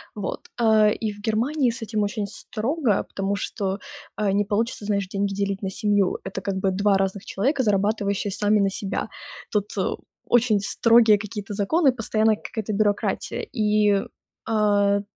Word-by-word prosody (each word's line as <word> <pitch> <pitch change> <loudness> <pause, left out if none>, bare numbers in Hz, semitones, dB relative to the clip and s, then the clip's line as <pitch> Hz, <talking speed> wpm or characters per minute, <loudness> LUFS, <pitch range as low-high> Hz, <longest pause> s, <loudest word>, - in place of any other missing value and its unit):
Вот, 200 -3 -5
а, 220 -2 +5
и 215 0 -2
в 205 - -14
Германии 240 +6 +1
с 235 +2 -5
этим 215 -1 -2
очень 205 0 -2
строго, 225 - -1
потому 195 +1 -3
что, 195 -1 -3 0.4
а, 210 -2 0
не 205 +1 +2
получится 210 +1 -2
значит 200 -2 -1
деньги 200 0 -1
делить 200 0 -2
на 195 - -2
семью. 205 -2 +1
Это 190 0 -5
как 195 0 -2
бы 190 0 +1
2 200 +1 +2
разных 195 0 -1
человека, 265 +8 0
зарабатывающие 205 -1 0
сами 210 +2 +2
на 195 -1 +3
себя. 195 0 -3 0.4
Тут 210 -1 0 0.6
очень 235 -3 +3
строгие 225 +1 +4
какие-то 210 0 -6
законы, 270 - +3
постоянно 220 -2 +1
какая-то 215 0 -5
бюрократия. 205 0 0
И, 210 -3 +3 0.5
а, 205 -2 +2
205 Hz, 155 wpm, -24 LUFS, 200-220 Hz, 0.6 s, а